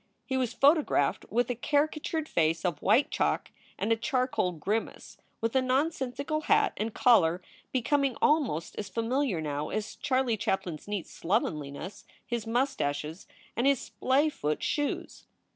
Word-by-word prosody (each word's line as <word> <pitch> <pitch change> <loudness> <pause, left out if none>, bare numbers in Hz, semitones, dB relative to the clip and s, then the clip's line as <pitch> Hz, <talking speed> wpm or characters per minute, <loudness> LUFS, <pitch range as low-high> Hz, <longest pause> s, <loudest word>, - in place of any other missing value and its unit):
He 265 - -2
was 255 -3 0
photographed 280 - +3
with 245 +3 +1
a - - -2
caricatured 305 +4 0
face 165 - +1
of 165 -5 -1
white 225 +8 +3
chalk - - 0 0.3
and 210 +3 -1
a - - +5
charcoal 255 -5 0
grimace, 200 +7 -3 0.2
with 225 +2 -1
a 265 - +5
nonsensical 280 +2 -1
hat 425 -1 +3
and 220 +2 -2
collar 180 -9 +4 0.3
becoming 270 0 +1
almost 265 - +1
as 205 - -4
familiar 230 - 0
now 150 0 -3
as 215 0 -3
Charlie 260 -5 +1
Chaplin 190 -6 -1
s - - -19
neat 205 -4 -3
slovenliness, 160 0 -3 0.2
his 235 -3 -3
mustaches, 170 - -1 0.3
and 240 +4 +2
his 275 -3 +4
splay 275 +4 +1
foot 150 - -2
shoes. 290 -1 -2
235 Hz, 145 wpm, -29 LUFS, 180-275 Hz, 0.3 s, a